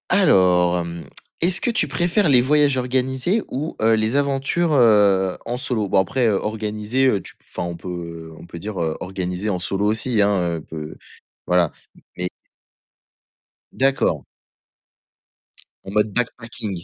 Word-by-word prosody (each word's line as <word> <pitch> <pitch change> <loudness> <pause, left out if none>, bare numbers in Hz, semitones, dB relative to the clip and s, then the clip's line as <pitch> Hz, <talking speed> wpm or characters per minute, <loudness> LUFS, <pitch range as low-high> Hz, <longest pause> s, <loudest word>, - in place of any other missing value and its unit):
Alors, 90 - +4
hem, 85 -1 -6 0.4
est-ce 180 +3 +4
que - - 0
tu 235 - +1
préfères 175 +3 +1
les 125 -3 +6
voyages 145 +1 +3
organisés 130 - 0
ou 150 +5 -4
heu, 110 +1 +4
les 110 +3 0
aventures, 140 +4 0
heu, 100 -7 +4
en 120 +1 -3
solo? 120 -5 -2
Bon 95 - +2
après, 120 +5 +1
organisés, 105 +4 -1
heu, 100 -7 +1
tu - - -11
p - - -36
enfin, - - -4
on 85 -1 -6
peut 85 -2 -7
on - - -12
peut 85 - -9
dire 105 +3 -6 0.2
organisés 95 +2 -4
en 90 -3 -1
solo 95 +3 -1
aussi, 110 +1 +2
hein, 90 -5 +1
peut 75 -1 -7 0.5
voilà. 90 -3 +2 0.5
Mais 90 0 -2 1.4
D'accord. 135 0 +1 1.6
En 95 - -8
mode 105 -1 +1
backpacking? 115 -6 -3
105 Hz, 145 wpm, -21 LUFS, 90-130 Hz, 1.6 s, les